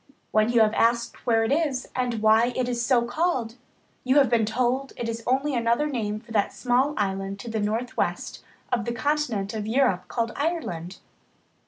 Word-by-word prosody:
When 215 +2 +3
you 235 -2 +4
have 215 0 +4
asked 235 +2 0
where 225 -1 +3
it 225 - -1
is 285 -4 0
and 245 -4 -1
why 225 +3 +4
it 255 -1 0
is 240 -1 -1
so 240 -1 +3
called, 250 -4 -1 0.5
you 260 +1 +2
have 275 -5 +5
been 225 -3 +3
told 250 +4 0
it 235 - -3
is 230 0 -4
only 270 +3 +1
another 235 +3 +1
name 220 -7 -2
for 230 +1 -17
that 205 -3 +1
small 260 +4 +1
island 195 -1 -2
to 235 - -7
the 220 - -1
northwest 220 +4 -2 0.3
of 235 - 0
the 235 - -2
continent 240 -6 -1
of 215 -1 -4
Europe 220 -7 +1
called 230 +2 -2
Ireland. 240 - -3
235 Hz, 185 wpm, -25 LUFS, 220-255 Hz, 0.5 s, have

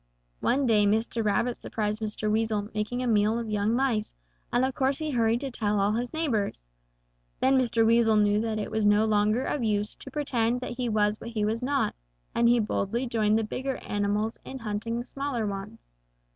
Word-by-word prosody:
One 275 +2 +1
day 210 -4 +4
Mr. 225 +2 0
Rabbit 230 +4 +1
surprised 210 0 -3
Mr. 215 0 -3
Weasel 215 -1 0
making 215 +4 -2
a - - -1
meal 215 0 +3
of 230 -2 -4
young 210 +2 +1
mice, 245 -5 0 0.4
and 245 +2 +3
of 265 - -2
course 265 +2 +1
he 310 -1 -3
hurried 230 -1 +2
to 275 -2 -4
tell 210 -3 0
all 200 +1 +2
his 240 +3 -2
neighbors. 220 - -2 0.7
Then 265 +1 +3
Mr. 235 -3 +3
Weasel 225 -1 +4
knew 210 0 +3
that 220 -1 -2
it 215 - -4
was 220 0 0
no 205 +1 +4
longer 215 +3 +2
of 275 -2 -2
use 210 -1 0
to - - -9
pretend 250 -4 0
that 255 - -4
he 250 -2 -1
was 210 -1 +1
what 235 - -6
he 215 -3 -1
was 225 +3 -1
not, 275 +2 0 0.4
and 235 0 +3
he 240 - +5
boldly 220 +3 -1
joined 220 -3 +2
the 225 - +1
bigger 260 +5 -3
animals 205 +2 -2
in 265 - -7
hunting 230 0 -3
the 240 - -4
smaller 275 -4 -3
ones. 200 - -7
225 Hz, 200 wpm, -27 LUFS, 210-245 Hz, 0.7 s, he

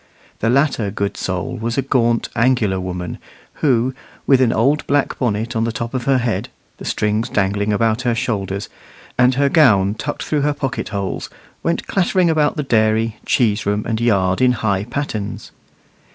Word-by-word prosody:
The 115 - +1
latter 135 -5 +2
good 100 0 -2
soul 95 +6 -3
was 115 +2 -3
a 135 - +2
gaunt, 120 -3 +1
angular 115 -5 +2
woman, 90 -2 -5 0.4
who, 130 -3 +2 0.3
with 135 -2 +4
an 120 -3 +4
old 140 +7 +1
black 145 0 +1
bonnet 115 0 -1
on 110 - +1
the 115 - 0
top 115 +2 -5
of 125 -2 -2
her 135 -1 +3
head, 120 -2 -1 0.3
the - - -9
strings 110 +3 0
dangling 100 0 0
about 110 +2 +1
her 120 -2 0
shoulders, 100 -4 -2 0.5
and 125 +1 +4
her 140 +1 +3
gown 105 - +4
tucked 130 +7 -4
through 150 -2 0
her 145 +1 +1
pocket 135 -7 -3
holes, 100 -2 -3 0.3
went 170 - -1
clattering 185 -2 +2
about 150 -2 +2
the 150 - 0
dairy, 110 -2 +1
cheese 105 -4 +1
room, 105 +1 0
and 115 0 -1
yard, 95 -5 +2
in 125 -1 +5
high 100 -3 -1
pattens. 115 -5 -4
115 Hz, 175 wpm, -19 LUFS, 105-130 Hz, 0.5 s, in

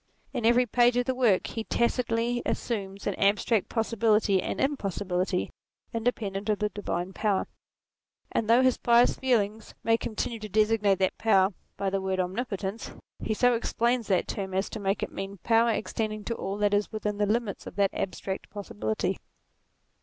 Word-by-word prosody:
In 240 -4 +1
every 245 +1 +5
page 240 +1 +3
of 245 - +2
the 260 - 0
work 240 -7 +3
he 225 - -4
tacitly 235 0 0
assumes 200 -4 -3
an 205 - 0
abstract 205 +1 +2
possibility 220 -4 +2
and - - -3
impossibility, 195 -8 -1 0.4
independent 220 -3 -2
of 210 - +2
the 210 0 0
divine 190 -3 -4
power: 205 -2 0 0.9
and 220 - -1
though 240 +3 +6
his 255 -1 +3
pious 240 +1 +4
feelings 220 -4 0
make 225 0 +2
him 220 - -4
continue 230 +1 -2
to 215 0 -7
designate 210 -1 +3
that 190 0 0
power 195 -3 +4 0.2
by 195 -1 -1
the 195 0 0
word 190 0 -1
Omnipotence, 195 +2 -3 0.3
he 220 - -2
so 245 +2 +4
explains 235 0 0
that 190 -3 +1
term 190 -2 -4
as 190 +1 -1
to 220 - -5
make 195 0 -1
it - - -4
mean, 195 +1 -6
power 230 0 +4
extending 215 -1 -2
to 230 - -2
all 200 -3 -4
that 205 0 +2
is 205 0 +1
within 210 -1 -3
the 205 - +2
limits 220 -1 -1
of - - -9
that 200 -1 +2
abstract 190 0 -4
possibility. 110 - -3
215 Hz, 175 wpm, -28 LUFS, 195-230 Hz, 0.9 s, though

